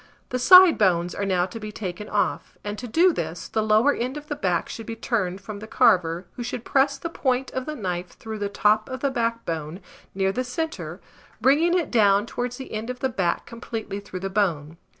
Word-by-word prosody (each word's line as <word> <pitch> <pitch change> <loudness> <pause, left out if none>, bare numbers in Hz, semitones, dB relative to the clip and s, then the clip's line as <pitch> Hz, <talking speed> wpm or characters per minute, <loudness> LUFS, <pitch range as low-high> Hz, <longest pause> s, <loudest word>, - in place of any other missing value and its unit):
The 255 - -2
side 365 +4 +8
bones 175 -3 +2
are 200 - -2
now 180 -2 +2
to 190 +5 -8
be 215 -1 -6
taken 205 0 -6
off; 205 - -1
and 205 0 -4
to 245 - -6
do 340 +9 +4
this, 165 - -4
the 220 - -1
lower 215 +6 +4
end 255 +4 -3
of 295 0 -10
the 295 - -2
back 180 -9 0
should 225 - -8
be 230 - -4
turned 200 -5 -2
from 205 +1 -7
the 215 - -9
carver, 175 -3 +3
who - - -6
should 240 -1 -5
press 275 +1 +2
the - - -4
point 265 -5 -1
of 260 +1 -4
the 305 - -3
knife 180 - -4
through 220 -1 -7
the 205 -1 -2
top 210 +2 +2
of 260 0 -5
the 280 - +1
backbone, 190 - -2 0.4
near 195 0 +1
the 255 +6 -2
centre, 320 +6 -4 0.4
bringing 305 +9 +4
it 340 - -2
down 205 -3 +4
towards 245 +1 -4
the 265 - -9
end 220 +2 -4
of 250 0 -5
the 265 - +1
back 180 -7 -1
completely 225 -3 -6
through 195 -2 -8
the 195 - -3
bone. 165 -6 -1
220 Hz, 220 wpm, -24 LUFS, 190-255 Hz, 0.4 s, side